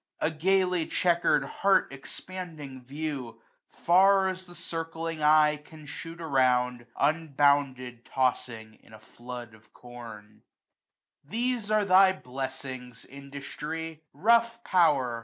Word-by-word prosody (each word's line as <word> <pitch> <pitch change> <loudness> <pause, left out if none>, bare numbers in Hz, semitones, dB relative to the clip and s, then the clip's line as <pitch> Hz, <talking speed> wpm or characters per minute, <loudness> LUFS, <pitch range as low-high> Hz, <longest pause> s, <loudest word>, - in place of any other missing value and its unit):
A 160 - 0
gaily 180 +1 +1
checker'd 175 -1 +2
heart 195 -7 +2
expanding 150 -2 -8
view, 135 -4 -5 0.3
40 - - -25
Far 190 +2 +5
as 185 0 -6
the 175 - -13
circling 165 -1 -4
eye 150 0 +5
can 155 +1 -15
shoot 165 +4 -8
around. 125 -5 +1
Unbounded 140 -5 +1
tossing 125 -4 -2
in - - -20
a - - -14
flood 120 +1 -10
of 110 0 -21
com. 115 -4 -12 0.8
These 230 - -2
are 215 -1 +2
thy 190 0 +6
blessings. 130 -4 -7
Industry! 150 +4 -7
rough 235 +2 +2
power 140 -10 +2
150 Hz, 115 wpm, -28 LUFS, 125-175 Hz, 0.8 s, thy